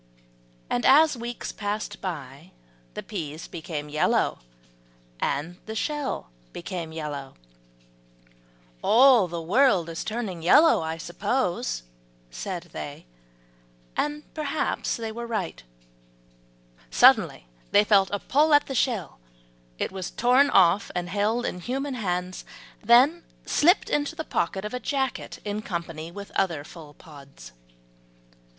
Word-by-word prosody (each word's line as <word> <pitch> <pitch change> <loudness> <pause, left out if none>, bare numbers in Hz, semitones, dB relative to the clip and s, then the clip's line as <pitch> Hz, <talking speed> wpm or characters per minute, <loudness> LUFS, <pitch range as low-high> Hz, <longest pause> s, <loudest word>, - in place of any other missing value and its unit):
And 120 - -1
as 300 +2 +6
weeks 240 0 -5
passed 210 0 -4
by, 155 -2 -7 0.4
the - - -5
peas 160 -6 -6
became 160 -3 -6
yellow, 150 +1 +1 0.8
and 165 - -2
the 220 - -5
shell 285 - -3 0.2
became 170 -2 -5
yellow. 145 -4 -6 1.5
"All 245 -4 +6
the 170 0 -5
world 195 -3 +3
is 165 - -4
turning 215 -6 -4
yellow, 295 - +6
I 160 0 -3
suppose," 175 - -2 0.5
said - - -6
they, - - -7 0.9
and 295 0 -1
perhaps 305 -1 -2
they 225 -1 -4
were 235 +1 -6
right. 210 - -3 1.3
Suddenly - - +5 0.2
they 205 - +5
felt 200 -2 +4
a 205 - 0
pull 295 +8 +3
at 290 - +4
the 270 - -5
shell; 225 - -1 0.6
it - - -2
was 190 -2 -5
torn 255 +4 +4
off, 185 +2 +4
and 175 0 -2
held 210 +5 0
in 180 - -3
human 270 +8 -3
hands, 180 -5 -3 0.4
then 255 +10 +5 0.2
slipped 350 +6 +3
into 295 +2 0
the 320 - -4
pocket 190 - -2
of 210 - -5
a 250 - -2
jacket 265 +1 -2
in 210 +1 -3
company 170 -4 -5
with 200 +2 -9
other 170 -7 0
full 150 -2 -12
pods. 140 - -14
200 Hz, 125 wpm, -26 LUFS, 165-250 Hz, 1.5 s, as